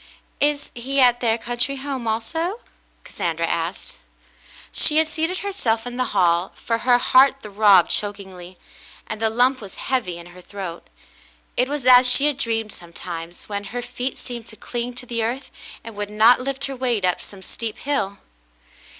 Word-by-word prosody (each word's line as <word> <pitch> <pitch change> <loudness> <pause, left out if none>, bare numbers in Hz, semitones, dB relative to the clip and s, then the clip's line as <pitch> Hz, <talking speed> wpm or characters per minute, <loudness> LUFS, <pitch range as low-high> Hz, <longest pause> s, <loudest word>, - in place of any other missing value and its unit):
"Is 290 0 0
he 265 +4 -2
at 245 -2 +5
their 230 -2 +2
country 240 +4 -1
home 265 -3 -4
also?" 325 - -2 0.4
Cassandra 165 -1 -2
asked. 165 +2 -3 0.7
She 305 - +5
had 315 0 +4
seated 325 +4 -2
herself 230 - -1
in 245 0 -6
the 255 - +1
hall, 175 0 +2
for 230 -1 -2
her 245 0 +4
heart 270 +2 +4
throbbed 200 -4 +5
chokingly, 190 -3 -4 0.5
and 215 0 -5
the 225 - +3
lump 250 +3 +2
was 195 -3 -10
heavy 225 -10 -2
in 170 - -10
her 180 - -13
throat. 185 -3 -7 0.7
It 250 +2 +1
was 290 -3 -3
as 250 0 +8
she 280 - +5
had 295 -2 +1
dreamed 225 -3 -1
sometimes, 170 0 -8
when 205 -1 -4
her 245 +4 -5
feet 250 +2 -4
seemed 240 -2 -8
to 220 - -12
cling 240 +2 -5
to 250 - -6
the 230 -2 -2
earth, 250 +4 -3 0.3
and 230 -1 -9
would 205 0 -4
not 220 +4 +5
lift 275 +1 -2
her 275 - -5
weight 245 -6 0
up 180 - 0
some 195 -2 -12
steep 225 +2 -6
hill. 200 -9 -2
235 Hz, 175 wpm, -22 LUFS, 200-260 Hz, 0.7 s, as